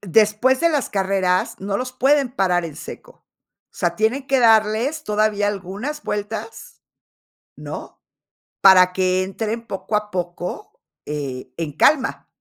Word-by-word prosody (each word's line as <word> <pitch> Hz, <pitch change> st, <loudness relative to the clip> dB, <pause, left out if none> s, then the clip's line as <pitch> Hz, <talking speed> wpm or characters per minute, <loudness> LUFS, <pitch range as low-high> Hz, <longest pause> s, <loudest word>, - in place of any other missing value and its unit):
Después 215 Hz, +7 st, +3 dB
de 335 Hz, -, +4 dB
las 295 Hz, -5 st, 0 dB
carreras, 190 Hz, -2 st, 0 dB
no 200 Hz, 0 st, -2 dB
los 255 Hz, +2 st, -4 dB
pueden 270 Hz, 0 st, +2 dB
parar 180 Hz, -7 st, +1 dB
en 155 Hz, -3 st, -7 dB
seco. -, -, -11 dB, 0.5 s
O -, -, -38 dB
sea, -, -, -1 dB
tienen 240 Hz, +6 st, 0 dB
que 270 Hz, -1 st, +2 dB
darles 225 Hz, +7 st, +3 dB
todavía 210 Hz, -1 st, +1 dB
algunas 205 Hz, +10 st, -5 dB
vueltas 210 Hz, -, -6 dB, 0.8 s
¿no? -, -, -8 dB, 0.6 s
Para 185 Hz, -1 st, +7 dB
que 185 Hz, 0 st, +1 dB
entren 220 Hz, +4 st, -4 dB
poco 205 Hz, +2 st, -4 dB
a 210 Hz, 0 st, -1 dB
poco, 180 Hz, -, -5 dB, 0.2 s
eh, 140 Hz, -4 st, -5 dB
en 165 Hz, -3 st, -4 dB
calma. 270 Hz, -3 st, +2 dB
210 Hz, 135 wpm, -21 LUFS, 185-255 Hz, 0.8 s, Para